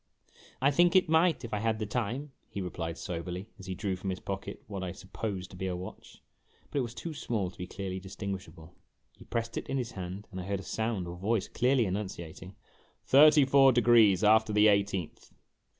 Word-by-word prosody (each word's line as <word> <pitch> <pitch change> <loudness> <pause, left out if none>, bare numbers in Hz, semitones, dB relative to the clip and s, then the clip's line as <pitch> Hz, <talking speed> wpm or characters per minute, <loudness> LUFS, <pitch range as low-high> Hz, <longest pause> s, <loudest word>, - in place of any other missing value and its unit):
" - - -25
I - - +5
think 175 +5 +4
it 185 -3 +5
might, 160 -3 +3
if 115 - -8
I 105 - 0
had 110 0 0
the 110 - -3
time," 125 +7 -3 0.2
he - - -6
replied 85 -3 -4
soberly, 90 +3 -5
as 95 - -10
he 95 - -3
drew 95 0 -2
from 95 +1 -5
his 95 - -3
pocket 95 0 -6
what 100 -3 -6
I 90 -1 -4
supposed 95 0 -5
to - - -11
be 95 +1 -3
a 90 - -2
watch; 90 +1 -10 0.5
but 145 - 0
it - - +2
was 115 -2 -5
too 165 - -5
small 105 -10 -2
to - - -21
be 90 - -5
clearly 95 0 -5
distinguishable. 95 -4 -7 0.4
He - - -15
pressed 115 -1 -3
it - - -5
in 135 - 0
his 125 -2 -3
hand, 95 +1 -7
and 95 -1 -5
I - - -7
heard 100 0 -2
a - - -8
sound 110 -5 -2
or 85 - -6
voice 100 +3 0
clearly 125 0 +2
enunciating: 95 -2 -5 0.3
" - - -36
Thirty 150 +1 +8
four 135 0 +6
degrees 115 -5 +5
after 110 +1 +5
the 105 +1 +6
eighteenth." 100 -4 -1
100 Hz, 215 wpm, -30 LUFS, 95-120 Hz, 0.5 s, Thirty